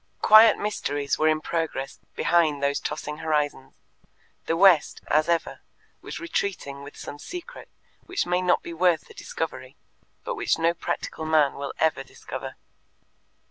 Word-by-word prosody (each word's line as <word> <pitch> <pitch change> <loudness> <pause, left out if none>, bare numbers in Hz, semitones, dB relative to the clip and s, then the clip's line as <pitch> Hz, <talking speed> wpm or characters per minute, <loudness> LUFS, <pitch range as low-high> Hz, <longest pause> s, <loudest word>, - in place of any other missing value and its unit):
Quiet 215 +1 +8
mysteries 145 -9 -2
were 155 - +3
in 155 0 +2
progress 155 -5 -3 0.2
behind 155 -5 +2
those 140 0 +1
tossing 150 0 -5
horizons: 150 -4 -2 0.7
the 165 - +1
West, 180 -4 +5
as 155 +2 +2
ever, 170 -1 0 0.4
was - - -7
retreating 195 - -3
with 145 +1 -11
some 145 - -8
secret 360 - -9 0.4
which 365 - -1
may 180 +1 +1
not 180 -1 +2
be 170 - -7
worth 175 0 +2
the - - -15
discovery, - - -6 0.5
but - - -3
which 455 - 0
no 165 +1 +2
practical 160 - -4
man 155 -3 +3
will 140 0 -6
ever 160 -4 +1
discover. - - -8
160 Hz, 145 wpm, -25 LUFS, 145-185 Hz, 0.7 s, Quiet